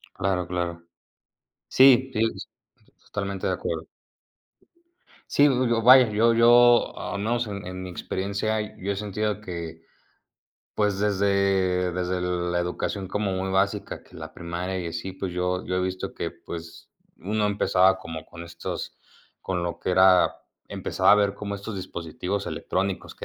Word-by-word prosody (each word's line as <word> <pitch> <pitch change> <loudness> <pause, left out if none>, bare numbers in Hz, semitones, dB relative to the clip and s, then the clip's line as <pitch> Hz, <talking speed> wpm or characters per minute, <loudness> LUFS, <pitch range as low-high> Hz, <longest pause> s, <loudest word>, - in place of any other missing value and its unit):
Claro, 90 -2 -1
claro. 85 -1 -3 0.9
Sí, 130 0 +6
sí, 110 - 0 0.8
totalmente 100 -1 -3
de - - +1
acuerdo. - - -4 1.5
Sí, 145 - +4
yo 130 -3 +3
yo 115 -1 +1
vaya 125 0 +8
yo 110 +2 +3
yo 120 +1 +5
al 100 - -4
menos 120 +2 0
en 100 -1 -6
en 90 0 -6
mi 90 - -6
experiencia, 100 +4 -3
yo 100 +2 -2
he - - -5
sentido 105 +1 -2
que 85 -4 -6 1.0
pues 105 -2 +1
desde 100 -3 +1
desde 90 +1 -2
la 90 -1 -1
educación 90 +2 -3
como 105 -1 -1
muy 95 +1 -2
básica, 100 +2 -1
que - - -21
la - - -8
primaria 90 +2 -4
y 85 - -4
así 85 +3 -5
pues 95 -1 -5
yo 90 +1 -2
yo 90 - -2
he 90 - +1
visto 95 0 -3
que - - -3
pues 85 0 -10 0.3
uno 105 +2 -1
empezaba 95 -2 +3
como 80 -3 -7
con 85 0 -10
estos 85 0 -6 0.5
con 90 -2 -2
lo 85 - -4
que - - -2
era 95 0 +5 0.3
empezaba - - +1
a - - +9
ver 100 -1 +2
como 100 -1 -5
estos 100 +2 -7
dispositivos 90 +2 -4
electrónicos 95 0 -3
que - - -8
95 Hz, 155 wpm, -25 LUFS, 90-105 Hz, 1.5 s, a